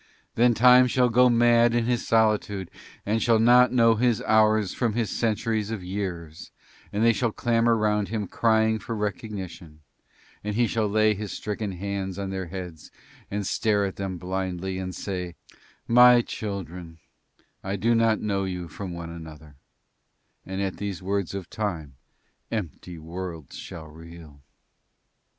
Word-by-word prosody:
Then 120 0 +3
Time 125 +2 +7
shall 125 0 +2
go 125 +2 +5
mad 120 0 +4
in 120 -1 +1
his 120 -1 -1
solitude 105 -4 +1 0.3
and 110 +2 0
shall 115 -1 +4
not 120 +2 +5
know 115 -2 +5
his 115 0 +1
hours 110 -2 +3
from 115 -4 -1
his 115 -1 -1
centuries 110 -1 -1
of 110 -5 -5
years 90 -4 -5 0.4
and 105 +2 -1
they 115 - +5
shall 115 +1 0
clamour 115 +1 +2
round 105 -1 +1
him 110 -1 -3
crying 110 0 +2
for 115 - -5
recognition 95 -7 -6 0.6
and 105 0 -3
he 120 +1 +3
shall 110 -1 0
lay 110 +1 +3
his 105 0 -6
stricken 105 -1 -4
hands 95 0 -4
on 100 -1 -4
their 95 -2 -4
heads 90 -3 -8 0.4
and 100 0 -3
stare 105 0 +1
at 95 - -5
them 95 -2 -4
blindly 95 +1 -3
and 90 -1 -5
say, 90 -3 -5 0.5
'My 125 0 +7
children, 90 -7 -6 0.7
I 95 +1 -2
do 115 +4 +1
not 115 -1 +3
know 100 -2 -1
you 90 -1 -4
one 85 - -8
from 90 +2 -7
another,' 80 -3 -10 0.9
and 95 +1 -4
at 95 -1 -3
these 100 -2 -5
words 100 -1 -2
of 95 -3 -5
Time 85 -10 -4 0.6
empty 90 -4 -5
worlds 80 -2 -7
shall 80 - -8
reel." 80 -2 -13
100 Hz, 155 wpm, -25 LUFS, 90-115 Hz, 0.9 s, Time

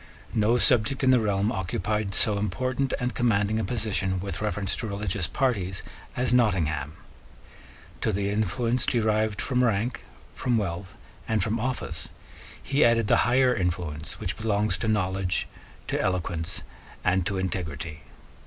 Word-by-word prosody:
No 110 +3 +3
subject 125 +2 +3
in 130 - +5
the 125 - +6
realm 105 -1 +1
occupied 95 +2 -1
so 105 -2 +4
important 130 +5 -1
and 125 0 -1
commanding 110 -2 +1
a - - -1
position 100 -6 -1
with 95 -1 -4
reference 105 -2 -1
to 115 - -3
religious 100 -3 -1
parties 100 -9 -1 0.3
as 125 -1 +1
Nottingham. 80 - +2 1.1
To - - +1
the 100 0 -1
influence 110 +4 0
derived 110 -2 +1
from 125 -2 +1
rank, 115 +1 0 0.3
from 125 -2 0
wealth, 90 -3 -3 0.3
and 110 -3 +1
from 115 +1 -1
office, 85 -10 -3 0.5
he 140 +2 +2
added 115 -1 +4
the - - +4
higher 125 0 +4
influence 85 -7 -3
which - - -2
belongs 105 -3 +1
to 115 - -2
knowledge, 95 -3 0 0.4
to - - 0
eloquence, 90 -2 -2 0.4
and 95 0 +2
to 100 - -1
integrity. 80 -4 -4
105 Hz, 145 wpm, -26 LUFS, 95-115 Hz, 1.1 s, the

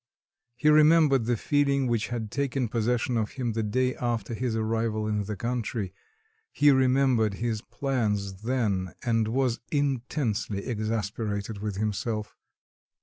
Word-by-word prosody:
He 150 - -1
remembered 150 -4 +5
the 120 0 +1
feeling 140 +1 +2
which 120 -3 0
had 115 -3 -4
taken 135 -4 -1
possession 120 +1 0
of 110 -1 -1
him 125 -3 -2
the 110 - -1
day 125 +4 +1
after 120 -3 -2
his 120 0 -2
arrival 110 -1 -1
in 105 -1 -1
the 105 +1 -4
country; 115 -3 -3 0.6
he 145 0 +5
remembered 130 -5 +3
his 110 0 -2
plans 105 -8 -2
then 105 -7 -1
and 115 -2 +1
was 125 0 0
intensely 125 -7 -1
exasperated 110 -2 -3
with 105 -1 -3
himself. 105 +1 -2
115 Hz, 135 wpm, -27 LUFS, 105-130 Hz, 0.6 s, remembered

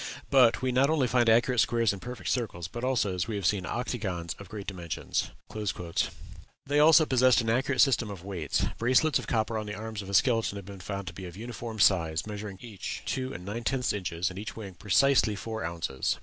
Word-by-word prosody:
But 130 -3 +5
we 130 - +1
not 130 +3 +3
only 155 -4 +2
find 120 -1 +3
accurate 120 +2 +4
squares 115 +1 +3
and 95 - -8
perfect 125 -1 -4
circles, 100 -9 -2
but 120 +7 -7
also, 125 -7 +1
as 90 +1 -2
we 110 - -3
have 100 -2 -3
seen, 95 -2 +1
octagons 95 -9 -3
of 100 -2 -11
great 105 -2 -7
dimensions." 85 -5 -3 1.4
They 145 +1 +2
also 155 +1 +7
possessed 130 -2 +4
an 115 0 0
accurate 130 +2 +2
system 120 -5 +3
of 95 -3 -8
weights; 90 -7 -1
bracelets 130 +6 +3
of - - -8
copper 110 -1 0
on 105 - -6
the 105 - -4
arms 110 -1 -5
of 100 - -9
a 100 - -1
skeleton 115 -5 +3
have 100 -2 -7
been 100 -1 -9
found 100 +1 -5
to 95 - -6
be 95 - -8
of 90 +1 -10
uniform 115 0 -6
size, 85 -6 +3
measuring 105 -2 -6
each 110 -6 -6
two 130 0 -2
and 90 -6 -8
nine 110 +4 -4
tenth 125 0 0
inches, 90 -2 -2
and 95 - -7
each 105 - -6
weighing 100 -4 -8
precisely 110 +4 +3
four 110 0 -5
ounces. 85 -6 -2
110 Hz, 215 wpm, -28 LUFS, 95-125 Hz, 1.4 s, also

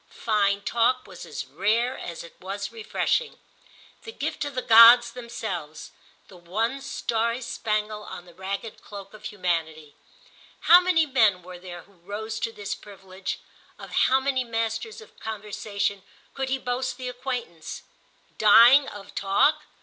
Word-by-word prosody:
Fine 200 -2 +2
talk 240 +3 +1
was - - -11
as - - -6
rare 235 +5 0
as 170 -8 -7
it 170 - -13
was 195 +2 -5
refreshing—the 450 - -4
gift - - -4
of 285 -2 -6
the 255 - -2
gods 235 +1 +8
themselves, 220 -11 -6 0.4
the 190 - -15
one 220 +10 -2
starry 235 -3 -1
spangle 215 -3 -2
on 175 - -9
the 175 - -16
ragged 195 +4 -6
cloak 200 -1 -10
of 215 - -13
humanity. 160 -6 -3 0.7
How 350 +2 +8
many 355 -3 +3
men 220 - +2
were 180 0 -10
there 175 -1 -9
who - - -24
rose 205 +5 -6
to 230 - -2
this 205 -2 -5
privilege, 190 -2 -8 0.4
of - - -11
how 265 +1 +3
many 265 -1 0
masters 230 - -3
of 445 - -17
conversation 205 -2 -3 0.3
could 265 -1 -3
he 265 - +1
boast 255 0 -3
the 255 -1 -6
acquaintance? 245 -10 -5 0.6
Dying 235 +6 +7
of 205 -1 -10
talk? 280 +10 +2
220 Hz, 145 wpm, -25 LUFS, 195-250 Hz, 0.7 s, gods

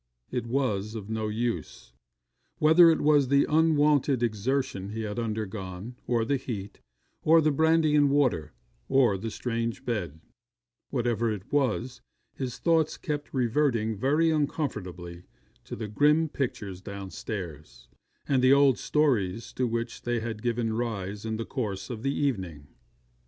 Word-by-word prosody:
It 125 -2 -3
was 115 -5 -1
of 110 -1 -6
no 110 -1 -1
use. 110 - -4 0.6
Whether 160 +3 +7
it 160 - +2
was 145 -2 +4
the 140 +2 +4
unwonted 150 -4 +3
exertion 115 -2 -1
he 110 +2 -4
had 105 +2 -4
undergone, 110 -1 -4
or 115 -2 +1
the 140 +4 +1
heat, 110 -7 -6 0.4
or 165 +1 +5
the 155 -1 +3
brandy 160 +1 +3
and 145 -1 +5
water, 125 - +1 0.4
or 130 -6 +4
the 105 +4 -4
strange 115 +3 -3
bed 90 -10 -3 0.7
whatever 120 -3 0
it 105 +3 -7
was, 130 -2 0 0.3
his 130 -3 -5
thoughts 165 -2 +2
kept 145 -1 -4
reverting 120 -3 +1
very 150 +9 +2
uncomfortably 95 - -3 0.4
to - - -6
the 110 0 -5
grim 150 +8 +3
pictures 105 -10 -4
downstairs, 90 - -7 0.4
and 135 -2 +2
the 130 +1 +5
old 140 -2 +4
stories 115 -9 0
to 125 - 0
which 115 0 -3
they 120 -1 -1
had 110 -1 -5
given 115 -1 -1
rise 105 -3 -3
in 110 0 -2
the 115 - -4
course 105 -4 -4
of 110 -3 -6
the 135 +2 0
evening. 95 - -2
120 Hz, 145 wpm, -27 LUFS, 105-140 Hz, 0.7 s, Whether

